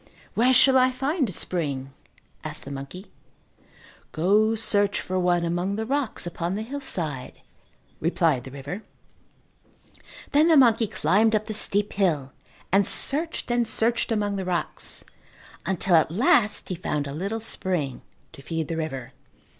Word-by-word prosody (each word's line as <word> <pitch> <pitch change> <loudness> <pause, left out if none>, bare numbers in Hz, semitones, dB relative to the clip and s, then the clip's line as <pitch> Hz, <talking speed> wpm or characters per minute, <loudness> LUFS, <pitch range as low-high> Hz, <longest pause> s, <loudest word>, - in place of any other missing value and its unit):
"Where 245 +3 +3
shall 260 0 +6
I 255 0 +4
find 270 - -1
a - - -4
spring?" 140 -7 -3 0.5
asked - - -3
the 140 - -7
monkey. 140 +8 -8 1.0
"Go 210 +7 +3
search 205 -2 +1
for 185 0 -2
one 175 -1 +2
among 175 +4 -1
the 220 +1 -3
rocks 270 -4 -2
upon 175 +1 -3
the 215 - -3
hillside," 180 - -3 0.6
replied 160 -5 +1
the 130 - -9
river. 140 +9 -7 1.5
Then 300 +3 +4
the 325 -2 +6
monkey 230 -4 +5
climbed 215 +4 +2
up 215 0 0
the 215 - -4
steep 205 -1 +1
hill 155 -9 0 0.4
and 195 +1 +4
searched 310 -2 0
and 240 -1 +1
searched 230 +2 0
among 205 -2 0
the 190 - -2
rocks 180 -2 -4 0.6
until 185 -1 +2
at 160 - +4
last 210 +3 +2
he - - -1
found 150 -4 -2
a 140 - -6
little 200 +8 -3
spring 180 - -1 0.3
to - - -12
feed 160 +1 -4
the 165 - -2
river. 135 -5 -5
190 Hz, 150 wpm, -25 LUFS, 160-225 Hz, 1.5 s, shall